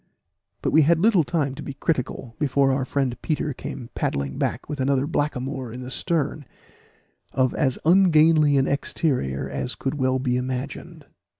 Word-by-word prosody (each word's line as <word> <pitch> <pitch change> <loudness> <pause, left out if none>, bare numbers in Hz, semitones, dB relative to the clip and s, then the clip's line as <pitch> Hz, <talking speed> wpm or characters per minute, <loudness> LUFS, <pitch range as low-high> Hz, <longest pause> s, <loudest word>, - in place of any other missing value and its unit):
But - - +1
we 160 - +6
had 160 +3 +4
little 195 -3 +4
time 145 -3 -1
to 145 - -8
be 140 - -7
critical, 130 -5 -2
before 140 -2 +2
our 130 0 0
friend 135 -3 -1
Peter 150 -2 -1
came 120 -1 -7
paddling 70 -1 -2
back - - -2
with 150 -1 -5
another 135 0 +1
blackamoor 135 -4 -2
in 125 +2 -7
the 125 - -7
stern, 155 0 -1 0.9
of 130 -1 +2
as 135 -4 0
ungainly 160 -4 +5
an 135 - +2
exterior 130 - -1
as 70 - -4
could 135 - -3
well 130 0 +2
be 125 -1 0
imagined. 130 +2 -5
135 Hz, 165 wpm, -24 LUFS, 130-150 Hz, 0.9 s, we